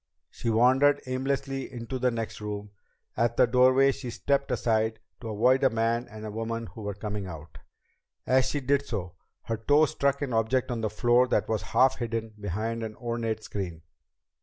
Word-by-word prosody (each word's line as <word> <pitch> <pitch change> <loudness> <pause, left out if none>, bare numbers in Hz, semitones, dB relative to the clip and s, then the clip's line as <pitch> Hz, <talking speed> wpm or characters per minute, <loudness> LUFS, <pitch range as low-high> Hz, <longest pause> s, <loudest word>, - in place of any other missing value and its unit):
She 115 - -3
wandered 130 +6 +4
aimlessly 135 +1 -2
into 125 +1 -5
the 125 - +3
next 115 -2 -4
room. 105 -1 -5 0.4
At 120 +1 +1
the - - +6
doorway 130 +3 +5
she 125 - -6
stepped 140 +3 0
aside 110 -1 0 0.2
to 115 - -7
avoid 125 +6 +3
a 135 - +6
man 115 +1 0
and 110 -1 -8
woman 115 +1 -3
who 115 - -10
were 100 -1 -4
coming 105 -1 -4
out. 80 -2 -10 0.7
As 130 0 +3
she 145 - -2
did 140 +2 +2
so, 95 -9 -5 0.3
her 115 - -2
toe 145 +8 +4
struck 140 -1 0
an 130 -4 -3
object 115 +3 +1
on 115 -2 -2
the 110 - 0
floor 120 +3 +3
that - - +1
was 110 -2 -1
half 130 0 +3
hidden 115 -2 -3
behind 110 +4 -2
an 110 -1 -5
ornate 115 -2 -3
screen. 90 -6 -5
115 Hz, 180 wpm, -27 LUFS, 110-130 Hz, 0.7 s, the